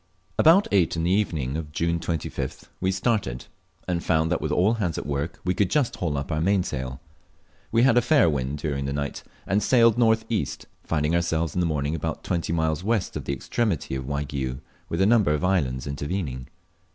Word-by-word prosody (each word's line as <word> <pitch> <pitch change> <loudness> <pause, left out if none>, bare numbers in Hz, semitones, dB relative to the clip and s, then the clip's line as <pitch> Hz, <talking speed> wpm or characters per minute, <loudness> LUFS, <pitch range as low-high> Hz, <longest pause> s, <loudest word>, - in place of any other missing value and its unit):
About 170 +6 +6
eight 90 -6 +3
in 80 - -1
the 85 - +1
evening 80 -10 0
of 80 -2 -5
June 85 +2 0
25th 80 -2 -4
we 95 +1 +1
started, 95 - -1 0.4
and 85 -2 -1
found 80 -1 +1
that - - 0
with - - -2
all 100 +6 +3
hands 95 -8 -1
at - - -4
work 75 +3 -3
we 90 - +2
could 95 0 +1
just 145 -2 +1
haul 80 -5 -1
up 70 +4 -4
our 75 0 0
mainsail. 65 -9 0 0.7
We 115 +1 +4
had 130 -2 +5
a - - +1
fair 125 - +4
wind 70 -2 -1
during 70 -2 -2
the 70 - -2
night 70 0 -3 0.2
and 100 +2 +1
sailed 115 -1 +4
north 110 -1 +3
east, 110 -3 -2 0.2
finding 75 0 0
ourselves 85 -1 0
in - - -1
the 85 - +2
morning 75 -1 -1
about 80 -1 -3
twenty 85 -3 -1
miles 80 0 0
west 110 -2 0
of - - -4
the 70 - -1
extremity 90 - -1
of 65 -1 -3
Waigiou 70 -3 -3 0.3
with 85 - -1
a - - +5
number 105 -8 +4
of 75 - -3
islands 70 -10 0
intervening. 70 -3 -4
85 Hz, 200 wpm, -25 LUFS, 70-100 Hz, 0.7 s, About